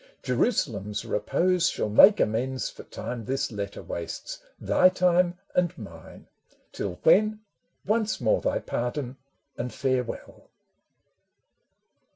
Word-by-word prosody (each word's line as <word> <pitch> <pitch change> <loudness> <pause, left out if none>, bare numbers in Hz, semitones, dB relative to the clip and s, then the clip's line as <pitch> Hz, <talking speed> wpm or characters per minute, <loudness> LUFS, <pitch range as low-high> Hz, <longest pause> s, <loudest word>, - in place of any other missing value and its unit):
Jerusalem's 105 - -1
repose 170 - +1
shall - - -2
make 190 - +7
amends 125 +4 -1
For - - -11
time 120 -2 -6
this 135 +1 -2
letter 100 -2 -5
wastes, 85 -1 -6 0.2
thy 185 - +4
time 180 -1 +2 0.2
and 175 -2 +1
mine; 85 -8 -11 0.5
Till 90 -3 -5
when, 215 +5 +4 0.4
once 215 +1 0
more 110 -3 +2
thy - - 0
pardon 125 +1 -3 0.4
and 120 +1 -3
farewell 130 -2 -3
130 Hz, 110 wpm, -26 LUFS, 110-180 Hz, 0.5 s, make